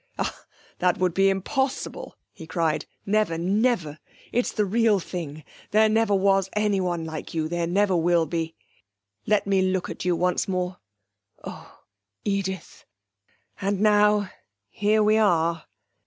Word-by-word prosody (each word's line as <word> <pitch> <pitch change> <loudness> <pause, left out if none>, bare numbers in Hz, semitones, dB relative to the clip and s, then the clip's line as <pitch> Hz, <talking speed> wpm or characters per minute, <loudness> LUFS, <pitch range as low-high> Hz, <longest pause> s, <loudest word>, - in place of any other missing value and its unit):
'Ah, - - -4 0.3
that 180 -1 +2
would 180 -2 +1
be 195 +2 +4
impossible!' 265 +8 -2 0.2
he 160 - -11
cried. 160 -2 -1 0.2
'Never 210 -5 +1
never! 185 -4 0 0.3
It's 245 - 0
the 210 - 0
real 215 0 +3
thing; 155 -4 -6 0.3
there 220 +1 +4
never 220 -1 +2
was 195 0 +2
anyone 190 -5 0
like 160 +1 -7
you, 155 -1 0
there 170 +1 -1
never 190 +2 +2
will 170 0 +3
be. 165 0 -3 0.7
Let 210 -1 +2
me 195 -1 +2
look 185 -1 0
at - - -6
you 180 -1 +1
once 180 +2 0
more....Oh, 105 - -8 0.4
Edith! 190 -3 -3 0.8
And 200 0 0
now 210 -1 +4 0.4
here 210 +1 +2
we 215 +1 +4
are.' 170 -5 +2
185 Hz, 135 wpm, -25 LUFS, 165-210 Hz, 0.8 s, be